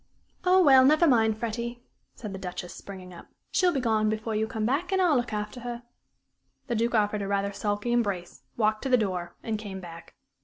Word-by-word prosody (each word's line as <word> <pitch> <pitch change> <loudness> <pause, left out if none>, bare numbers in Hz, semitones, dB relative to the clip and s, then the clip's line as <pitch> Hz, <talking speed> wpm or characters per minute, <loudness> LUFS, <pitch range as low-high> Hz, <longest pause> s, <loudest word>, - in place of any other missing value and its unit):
"Oh, 370 0 +5
well, 265 -4 +7
never 305 +5 +5
mind, 220 -5 +3
Freddie," 235 +2 -4 0.3
said 210 -4 -7
the 190 - -6
Duchess, 180 -1 -6
springing 185 -2 -10
up. 170 - -12 0.2
"She'll 365 -1 +3
be 280 - -1
gone 220 -3 +1
before 220 +1 -2
you 220 +1 0
come 220 -1 -3
back, 285 - 0
and 380 - +2
I'll 350 -5 +4
look 240 -2 0
after 210 +3 -4
her." 240 0 -6 0.8
The 245 - -3
Duke 235 +2 +1
offered 210 -1 +1
a 200 - -3
rather 200 0 -1
sulky 205 +3 -2
embrace, 200 -7 -1 0.2
walked 215 -1 +1
to 270 - -3
the 250 - +5
door, 180 -5 -2
and 220 -2 -2
came 200 -3 -7
back. 170 -2 -11
220 Hz, 205 wpm, -27 LUFS, 200-245 Hz, 0.8 s, well